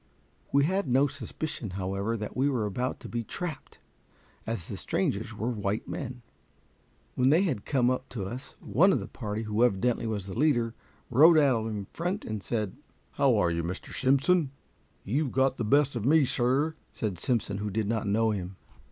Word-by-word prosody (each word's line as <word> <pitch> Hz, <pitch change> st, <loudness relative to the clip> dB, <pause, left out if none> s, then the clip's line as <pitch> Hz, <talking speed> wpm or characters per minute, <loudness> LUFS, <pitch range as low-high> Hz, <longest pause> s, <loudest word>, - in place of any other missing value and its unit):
We 140 Hz, 0 st, +4 dB
had 190 Hz, 0 st, 0 dB
no 130 Hz, +3 st, +4 dB
suspicion, 140 Hz, -2 st, -5 dB
however, 100 Hz, +4 st, -2 dB
that 105 Hz, -1 st, -6 dB
we 135 Hz, +2 st, +2 dB
were 120 Hz, -6 st, 0 dB
about 125 Hz, +6 st, -2 dB
to -, -, -8 dB
be 120 Hz, 0 st, -3 dB
trapped, 155 Hz, -, -6 dB, 0.7 s
as 110 Hz, -7 st, -3 dB
the -, -, -5 dB
strangers -, -, -1 dB
were 115 Hz, +4 st, -1 dB
white 105 Hz, -1 st, -2 dB
men. 125 Hz, -2 st, -5 dB, 0.9 s
When 130 Hz, +1 st, +3 dB
they 165 Hz, +6 st, +5 dB
had 135 Hz, -, -1 dB
come 125 Hz, -3 st, +2 dB
up 130 Hz, +1 st, -3 dB
to 105 Hz, -6 st, -4 dB
us, 125 Hz, +7 st, -7 dB
one 190 Hz, +5 st, +4 dB
of 140 Hz, -, +2 dB
the 100 Hz, -, -6 dB
party, 110 Hz, -2 st, -4 dB
who 110 Hz, +1 st, +1 dB
evidently 120 Hz, +1 st, +1 dB
was 105 Hz, -4 st, -3 dB
the 95 Hz, -, -6 dB
leader, 120 Hz, -3 st, +2 dB, 0.4 s
rode 160 Hz, +6 st, +7 dB
out 130 Hz, -7 st, +3 dB
in 105 Hz, -3 st, -4 dB
front, 180 Hz, +5 st, -2 dB
and 110 Hz, -2 st, -4 dB
said, 105 Hz, -3 st, -2 dB, 0.3 s
"How -, -, +3 dB
are 85 Hz, -1 st, +2 dB
you, 85 Hz, 0 st, -1 dB
Mr. 90 Hz, +3 st, -5 dB
Simpson?" 140 Hz, +4 st, +3 dB, 0.5 s
"You've 135 Hz, +6 st, 0 dB
got 130 Hz, 0 st, +2 dB
the 120 Hz, -, -1 dB
best 140 Hz, +5 st, +3 dB
of 115 Hz, -, -2 dB
me, 150 Hz, +3 st, +5 dB
sir," 130 Hz, +6 st, +2 dB, 0.2 s
said 100 Hz, -6 st, -3 dB
Simpson, 105 Hz, -5 st, 0 dB
who 105 Hz, 0 st, -2 dB
did 105 Hz, +1 st, -1 dB
not 110 Hz, -1 st, -1 dB
know 110 Hz, +2 st, +2 dB
him. 95 Hz, -2 st, -4 dB
120 Hz, 185 wpm, -28 LUFS, 105-140 Hz, 0.9 s, rode